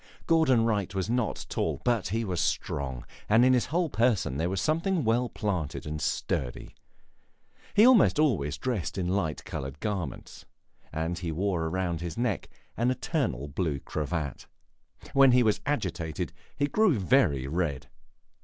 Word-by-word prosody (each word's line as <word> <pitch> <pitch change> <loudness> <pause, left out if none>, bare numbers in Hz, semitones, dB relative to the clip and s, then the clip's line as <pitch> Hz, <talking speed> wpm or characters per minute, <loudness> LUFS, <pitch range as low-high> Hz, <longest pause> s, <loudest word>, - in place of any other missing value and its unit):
Gordon 140 -9 +4
Wright 100 -4 -1
was 95 +3 -1
not 120 -3 -1
tall, - - -2
but 120 -5 +1
he 115 +4 -1
was 90 -4 -1
strong, 70 -7 -2 0.2
and 115 +4 +6
in 130 - +5
his 125 - +2
whole 170 +4 +1
person 110 - +1
there 85 +3 0
was 95 0 -1
something 165 - +1
well 120 +2 +1
planted 90 -9 -3
and 75 0 -4
sturdy. 60 -2 -2 1.0
He 210 - +7
almost 250 -11 +6
always 95 - +1
dressed 115 -6 -3
in 90 -2 -1
light 90 -5 -1
colored 70 +2 -6
garments, 95 - -4 0.5
and 80 +3 -2
he 85 -2 -3
wore 85 -1 -1
round 85 -2 -2
his 85 +2 -5
neck 120 -5 -1 0.3
an 120 +2 +1
eternal 125 - -1
blue 75 -1 -2
cravat. 75 0 -4 0.7
When 135 -2 +6
he 125 0 +5
was 110 -2 +1
agitated 85 - -2 0.2
he 145 - +2
grew 185 - +3
very 95 - +2
red. 75 -2 -2
95 Hz, 155 wpm, -28 LUFS, 80-125 Hz, 1.0 s, He